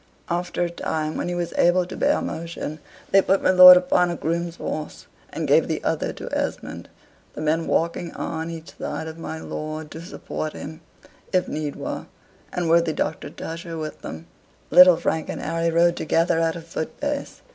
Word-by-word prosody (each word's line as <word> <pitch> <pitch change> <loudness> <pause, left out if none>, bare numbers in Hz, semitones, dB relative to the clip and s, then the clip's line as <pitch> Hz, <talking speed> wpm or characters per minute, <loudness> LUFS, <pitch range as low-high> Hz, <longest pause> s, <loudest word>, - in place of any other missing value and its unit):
After 175 0 -1
a 175 - -1
time, 155 -2 -3
when - - -2
he 175 - -2
was 175 -1 -3
able 175 +1 +4
to - - -8
bear - - +2
motion, 165 -2 -5 0.3
they 195 - +7
put 195 +1 +1
my - - +5
lord 180 0 +11
upon 180 0 +2
a 170 - -2
groom's 170 +1 -2
horse, 155 -3 -5 0.3
and - - -3
gave - - +4
the - - -1
other - - -1
to - - -8
Esmond, - - -4 0.4
the - - -7
men 160 +2 0
walking 170 0 0
on 160 0 -4
each 165 -1 -9
side 160 - -4
of 160 +1 -8
my 160 -1 -5
lord, 155 0 -6
to 160 - -8
support 160 -3 -5
him, 155 +2 -8 0.5
if 185 -1 +2
need 150 -2 -3
were, - - -5 0.4
and 175 -1 -2
worthy 165 -1 +3
Doctor 155 - -3
Tusher 165 0 -7
with 155 -1 -6
them. 80 +1 -8 0.5
Little 180 -1 +9
Frank 160 -1 -1
and - - -4
Harry 165 +1 -1
rode 170 +1 +3
together 165 +1 +1
at 165 -1 +1
a 170 - -6
foot 165 -1 -6
pace. 290 -1 -4
165 Hz, 190 wpm, -23 LUFS, 160-175 Hz, 0.5 s, lord